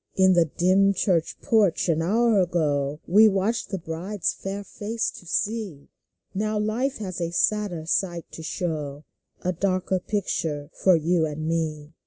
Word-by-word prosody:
In 190 Hz, 0 st, +5 dB
the 170 Hz, -2 st, +4 dB
dim 185 Hz, +5 st, +3 dB
church 170 Hz, -5 st, 0 dB
porch 210 Hz, -7 st, +2 dB
an 165 Hz, -2 st, +2 dB
hour 220 Hz, +4 st, +3 dB
ago, 150 Hz, -5 st, 0 dB
We 215 Hz, +4 st, +6 dB
waited 210 Hz, +3 st, 0 dB
the 195 Hz, -, -2 dB
bride's 175 Hz, +4 st, -3 dB
fair 195 Hz, +1 st, -5 dB
face 220 Hz, +3 st, -3 dB
to 175 Hz, -, -13 dB
see; 200 Hz, -7 st, -2 dB, 0.4 s
Now 215 Hz, +2 st, -1 dB
Life 230 Hz, +6 st, -1 dB
has 185 Hz, -4 st, -5 dB
a 170 Hz, -, -1 dB
sadder 180 Hz, -2 st, 0 dB
sight 170 Hz, 0 st, -1 dB
to -, -, -8 dB
show, 155 Hz, -3 st, -4 dB, 0.4 s
A 180 Hz, -, 0 dB
darker 185 Hz, +1 st, 0 dB
picture 160 Hz, -7 st, -2 dB
for 185 Hz, -2 st, +4 dB
you 165 Hz, 0 st, +2 dB
and 155 Hz, +1 st, -5 dB
me. 155 Hz, -2 st, -2 dB
180 Hz, 155 wpm, -25 LUFS, 160-205 Hz, 0.4 s, We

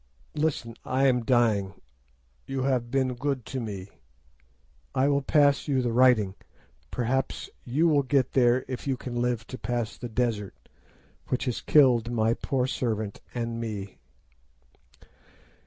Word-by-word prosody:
Listen, 150 Hz, -6 st, -1 dB
I 130 Hz, +2 st, +1 dB
am 125 Hz, -3 st, +3 dB
dying! 110 Hz, -6 st, +2 dB, 0.7 s
You 135 Hz, -1 st, -2 dB
have 125 Hz, -3 st, 0 dB
been 130 Hz, 0 st, +1 dB
good 130 Hz, 0 st, -2 dB
to 130 Hz, -, -4 dB
me. 100 Hz, -5 st, -5 dB, 1.1 s
I 130 Hz, +2 st, +3 dB
will 140 Hz, 0 st, +2 dB
give 145 Hz, 0 st, +3 dB
you 135 Hz, -3 st, +1 dB
the 120 Hz, -, 0 dB
writing. 120 Hz, -6 st, +4 dB, 0.6 s
Perhaps 125 Hz, +2 st, -2 dB
you 145 Hz, +7 st, +2 dB
will 150 Hz, -3 st, +4 dB
get 130 Hz, -1 st, +1 dB
there 125 Hz, 0 st, +3 dB
if 130 Hz, +1 st, -5 dB
you 135 Hz, -2 st, 0 dB
can 120 Hz, -1 st, -4 dB
live 120 Hz, -2 st, -1 dB
to 130 Hz, -, -8 dB
pass 120 Hz, 0 st, -3 dB
the 120 Hz, -, -6 dB
desert, 110 Hz, -4 st, -1 dB, 0.7 s
which 130 Hz, +2 st, -1 dB
has 125 Hz, -3 st, -2 dB
killed 125 Hz, -6 st, +4 dB
my 115 Hz, -1 st, +2 dB
poor 130 Hz, +1 st, -1 dB
servant 110 Hz, -5 st, -2 dB
and 115 Hz, -1 st, -3 dB
me. 105 Hz, -4 st, -6 dB
125 Hz, 140 wpm, -27 LUFS, 115-135 Hz, 1.1 s, writing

